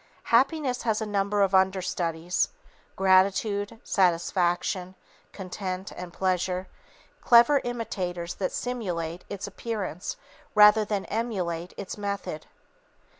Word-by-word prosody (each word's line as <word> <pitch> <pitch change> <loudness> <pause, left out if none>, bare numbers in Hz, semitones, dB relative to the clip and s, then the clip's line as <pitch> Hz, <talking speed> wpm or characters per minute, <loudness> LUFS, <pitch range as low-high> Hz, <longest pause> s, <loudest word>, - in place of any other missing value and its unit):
Happiness 265 0 +3
has 220 -2 0
a 220 - -2
number 205 0 +1
of 195 -1 +1
under 190 0 +4
studies, 170 -1 -1 0.5
gratification, 200 +3 +2
satisfaction, 180 0 +1 0.4
content, 190 0 -5
and 180 -1 -7
pleasure, 185 0 -1 0.6
clever 255 +4 +6
imitators 180 -8 -3
that 190 - -2
simulate 180 -9 -3
its 200 0 -5
appearance 200 -4 -4 0.4
rather 210 +1 +7
than 205 -2 -2
emulate 180 -7 -3
its 200 +1 -6
method. 200 -6 -4
195 Hz, 105 wpm, -27 LUFS, 180-215 Hz, 0.6 s, rather